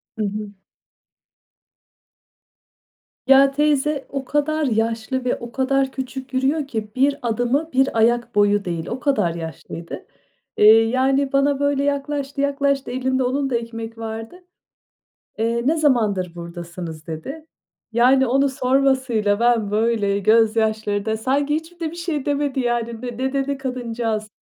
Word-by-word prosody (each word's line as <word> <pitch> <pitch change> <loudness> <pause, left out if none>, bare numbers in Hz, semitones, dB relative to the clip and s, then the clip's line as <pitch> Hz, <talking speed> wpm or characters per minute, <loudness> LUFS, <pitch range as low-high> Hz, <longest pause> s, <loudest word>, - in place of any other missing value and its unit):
Hı 215 - -1
hı. 205 0 -4 2.8
Ya, 275 0 +6
teyze 295 0 +1
o 275 -1 -4
kadar 300 +2 0
yaşlı 230 +2 -1
ve 250 - +1
o 235 -1 -9
kadar 270 +1 +1
küçük 265 0 -6
yürüyor 275 +3 +1
ki, 220 -4 -4
1 280 +2 +2
adımı 245 +6 0
1 265 -2 +2
ayak 235 +1 +2
boyu 205 -1 +3
değil, 170 -2 -3
o 245 - -4
kadar 255 - +1
yaşlıydı. 165 0 -7 0.5
Eee, 210 - +5 0.2
yani 265 +2 +1
bana 275 0 +2
böyle 285 -1 +1
yaklaştı 280 0 -2
yaklaştı, 280 -1 0
elinde 260 +1 0
onun 270 +2 0
da 245 - -1
ekmek 230 -1 -7
vardı. 225 +4 -6 1.0
Eee, 230 +1 0
"Ne 315 +4 +3
zamandır 210 - +1
buradasınız?" 170 -2 -8
dedi. 270 - -7 0.5
Yani 255 +3 +4
onu 275 +3 +2
sormasıyla 260 -5 +1
ben 235 -4 +2
böyle 210 -2 +1
gözyaşlarında 220 0 +2
Sanki 280 +5 0
hiçbir 325 +2 -5
de 320 -2 -2
bir 340 - -10
şey 330 -5 -3
demedi 285 -2 0
yani. 235 -2 -2
Ne 245 -1 -6 0.2
dedi 275 0 -1
kadıncağız? 235 -4 -3
255 Hz, 135 wpm, -21 LUFS, 220-275 Hz, 2.8 s, Ya